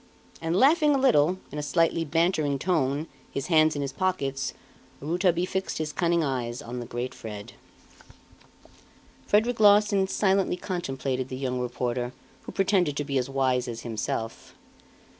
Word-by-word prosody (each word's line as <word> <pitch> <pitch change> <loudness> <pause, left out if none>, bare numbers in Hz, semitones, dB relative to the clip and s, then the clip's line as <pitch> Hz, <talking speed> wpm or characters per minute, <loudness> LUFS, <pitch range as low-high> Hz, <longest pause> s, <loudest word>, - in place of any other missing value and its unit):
And 165 +1 -1
laughing 295 - +5
a - - +3
little, 180 - +4
in 150 - -4
a - - -1
slightly 165 +2 +1
bantering 160 -2 +1
tone, 145 -2 0 0.2
his 135 - -4
hands 155 -1 +5
in 145 - -2
his 135 -1 -4
pockets, 140 -8 -1 0.4
Rouletabille 175 +3 +1
fixed 190 +1 -3
his 155 -1 -3
cunning 170 -2 +1
eyes 125 -4 -2
on 125 -3 -6
the 120 - -6
great 120 +2 -4
Fred. 105 -2 -8 1.7
Frederic 225 +3 +2
Larsan 205 -2 +5
silently 195 -2 +1
contemplated 135 -8 -3
the 130 - -5
young 130 -1 -2
reporter 125 0 -2 0.3
who - - -5
pretended 185 -7 +1
to 145 - 0
be 140 -2 0
as 125 - -3
wise 130 -2 +1
as 115 -1 -5
himself. 115 0 -4
150 Hz, 150 wpm, -26 LUFS, 130-185 Hz, 1.7 s, laughing